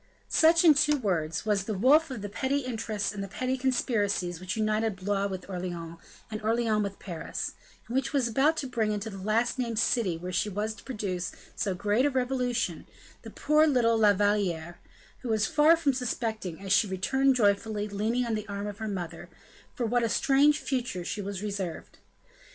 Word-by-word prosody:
Such, 330 +2 +5
in 315 - +9
two 295 +1 +3
words, 170 - -1
was 205 -3 +1
the 215 - -2
woof 290 - +5
of 235 -6 -6
petty 270 +6 0
interests 225 -5 -3
and 195 -1 -5
petty 255 +6 -2
conspiracies 210 -9 0
which 185 +3 -4
united 215 -1 0
Blois 200 +1 -1
with 190 -2 -6
Orleans, 175 -3 -5 0.3
and 215 - -4
Orleans 220 -1 +1
with 200 -1 -3
Pairs; 170 -4 -5 0.3
and 235 - -8
which 270 0 0
was 275 -4 +1
about 280 +7 +2
to 280 - -2
bring 230 -4 -1
into 210 +1 -3
the 195 - -8
last 225 +6 0
named 235 -3 -2
city 210 -6 +1
where 180 +2 -6
she 185 +4 0
was 210 +2 -2
to 210 - -15
produce 195 -8 -4 0.2
so 200 -4 -1
great 210 +8 +2
a - - +2
revolution, 250 - -1 0.3
the - - -9
poor 305 +2 +3
little 240 -5 +3
La 215 -2 +5
Valliere, 185 -5 0 0.4
who 250 - -6
was 220 -1 +2
far 310 +3 +5
from 295 -4 +1
suspecting, 225 -8 -3
as 195 -1 0
she 210 - +4
returned 265 +9 +2
joyfully, 210 -1 +1
leaning 220 +5 -1
on 230 - -2
the 215 0 -3
arm 200 0 -4
of 205 0 -6
her 220 - -3
mother, 175 -5 -5 0.5
for 240 - -1
what 245 +2 +1
a 230 - +1
strange 280 +8 +4
future 245 -12 -3
she 210 - -3
was 200 0 -5
reserved. 195 -5 -5
215 Hz, 190 wpm, -28 LUFS, 195-250 Hz, 0.5 s, in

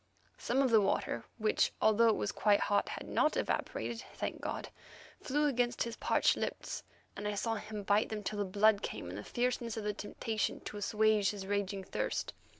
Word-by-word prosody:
Some 265 +3 +2
of 260 - +2
the 220 -2 +7
water, 195 - 0
which, 215 -2 +2
although 220 +2 +5
it 220 - +3
was 205 - -1
quite 205 -1 +3
hot, 205 - +1
had - - -6
not 305 - +2
evaporated, 235 - -2
thank - - -4
God! - - -4 0.5
flew 295 +2 +1
against 245 -4 +1
his 235 -1 -5
parched - - +3
lips, - - -4 0.3
and 205 +1 -4
I 210 - -1
saw 225 +3 0
him 210 -1 -5
bite 205 +2 +3
them 215 -1 -4
till 210 +1 -3
the 205 - +1
blood 205 +2 +4
came 90 - -5
in - - -6
the 105 - -6
fierceness 240 - -1
of 220 - -3
the 210 0 -1
temptation 215 +1 -2
to 210 - -7
assuage 210 0 +3
his 200 -2 -5
raging 200 -1 -1
thirst. - - -2
215 Hz, 195 wpm, -33 LUFS, 205-230 Hz, 0.5 s, the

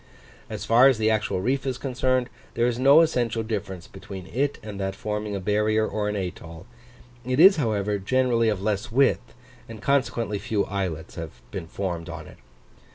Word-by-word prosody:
As - - -5
far 120 +4 +6
as 135 -4 +3
the 110 0 +2
actual 105 -4 0
reef 130 +6 0
is 130 -2 -2
concerned, 130 -1 0 0.3
there 120 - +2
is 120 0 0
no 140 +5 +7
essential 120 -8 0
difference 100 -5 -4
between 95 -1 -9
it 140 +8 -1
and 105 -2 -7
that 95 0 -2
forming 105 0 -3
a - - -2
barrier 105 +3 +1
or 105 -1 -2
an 105 - -2
atoll: 90 -3 -6 0.6
it 130 +3 -1
is, 190 +3 +8
however, 105 -6 0
generally 120 +2 +2
of 100 -3 -2
less 105 +2 -1
width, 125 -1 +1 0.3
and 115 -1 -8
consequently 115 -4 0
few 105 0 -1
islets 90 -5 -4
have 80 -6 -9
been 80 - -6
formed 85 -1 -4
on 80 -1 -7
it. - - -14
110 Hz, 180 wpm, -25 LUFS, 100-125 Hz, 0.6 s, is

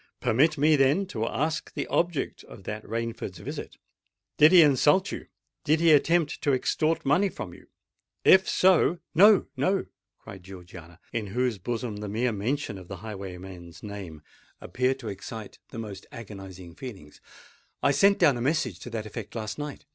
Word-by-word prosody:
"Permit 155 +7 +2
me, 150 +2 +4
then, 140 +7 +3
to 115 -11 -3
ask 155 +3 -2
the - - -2
object 170 -4 -1
of 100 - -13
that 105 +3 -5
Rainford's 115 -4 -4
visit? - - -7 0.6
Did 155 +2 +8
he 180 -3 +9
insult 150 +6 +3
you? - - -7 0.4
did 155 +1 +2
he 165 -1 +5
attempt 155 +1 +3
to 145 - +2
extort 155 +5 0
money 180 +9 +3
from 105 - -7
you? 95 - -16 0.6
If 190 0 +6
so——" 180 -2 +4 0.2
"No—no!" 195 +1 +4 0.3
cried 95 - -11
Georgiana, 90 -2 -12
in 110 -3 -2
whose 120 +1 -1
bosom 115 +1 -4
the 105 0 -5
mere 120 +4 0
mention 110 0 -3
of 90 - -13
the 95 - -7
highwayman's 95 -4 -9
name 95 -7 -8 0.4
appeared 130 +1 -1
to 115 - -7
excite 105 +1 -8
the - - -9
most 105 -4 -7
agonising 95 -6 -10
feelings. 95 - -10 0.6
"I 140 - +4
sent 200 +8 +4
down 140 -5 +4
a - - -4
message 130 - 0
to 125 - -8
that 110 -2 -4
effect 110 0 -8
last 110 +2 -5
night. 145 -1 -6
115 Hz, 165 wpm, -27 LUFS, 100-150 Hz, 0.6 s, he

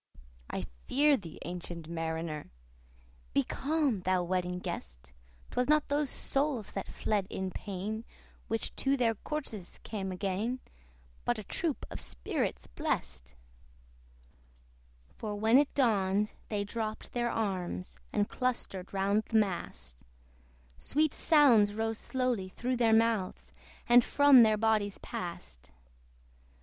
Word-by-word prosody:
"I - - -3 0.2
fear 290 +2 +5
thee, 170 - -8
ancient 175 -2 -6
Mariner!" 160 -2 -3 0.9
Be - - +5
calm, 285 - 0
thou 185 0 +1
Wedding 180 0 -1
Guest! - - -7 0.4
'Twas 250 +3 0
not 305 -1 +4
those 290 -1 +1
souls 275 -6 -1
that 195 - -4
fled 205 -3 -1
in 190 -1 -3
pain, 205 +4 -4 0.4
Which 225 0 -2
to 275 +1 +2
their 235 -3 +3
corses 225 - -5
came 195 -3 -4
again, 200 +6 -1 0.6
But 240 - +1
a 215 - -5
troop 315 - -2
of - - -5
spirits - - -2
blest: 60 0 -3 1.8
For 210 -2 -3
when 220 +5 +5
it 290 - +2
dawned 210 -5 +2 0.2
they 205 -2 0
dropped 215 +1 -4
their 240 -1 0
arms, 180 - -3
And 205 - +1
clustered 235 -7 -2
round 200 +2 +1
the 225 - +1
mast; 65 - -2 0.8
Sweet 305 - +1
sounds 240 -10 +5
rose 225 0 -1
slowly 250 -7 -1
through 250 +6 -2
their 230 -2 +4
mouths, 220 -4 +1 0.3
And 240 0 +8
from 285 -1 +7
their 215 -2 +5
bodies 215 -2 +1
passed. 65 - -7
210 Hz, 125 wpm, -31 LUFS, 180-245 Hz, 1.8 s, And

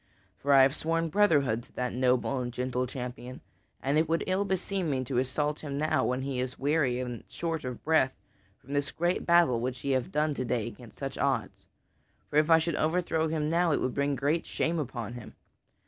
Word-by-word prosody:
For 140 - 0
I 135 -1 +8
have 135 +2 +3
sworn 165 +1 0
brotherhood 145 - +3
to - - -20
that 125 0 -2
noble 130 +1 +1
and 120 0 -3
gentle 125 +1 -2
champion, 125 0 -6 0.4
and 140 +3 +2
it 160 0 +1
would 165 +1 +1
ill 190 +2 +1
beseem 190 -2 -1
me 130 -2 0
to 125 0 -1
assault 145 +3 -1
him 140 -2 -5
now, 155 +2 +1
when 125 +1 -1
he 135 -2 -2
is 125 0 -3
weary 140 -3 +1
and 120 -2 -5
short 165 -2 -3
of 125 -2 -6
breath 155 -4 +3 0.4
from 140 - -10
this 145 0 0
great 175 +2 -1
battle 170 -9 +4
which 125 +1 -3
he 140 - -1
hath 130 -2 0
done 150 0 +1
to 130 - -3
day 120 -3 -1
against 120 -1 -10
such 135 -1 -5
odds. 135 -5 -1 0.6
For 145 - +1
if 155 +1 +4
I 165 - +8
should 165 -1 -1
overthrow 160 0 +1
him 155 -1 -1
now, 170 0 +2
it - - +2
would 130 - -1
bring 140 0 0
great 145 +5 0
shame 165 +1 -1
upon 120 -5 -4
him. 120 -3 -10
140 Hz, 210 wpm, -29 LUFS, 125-160 Hz, 0.6 s, I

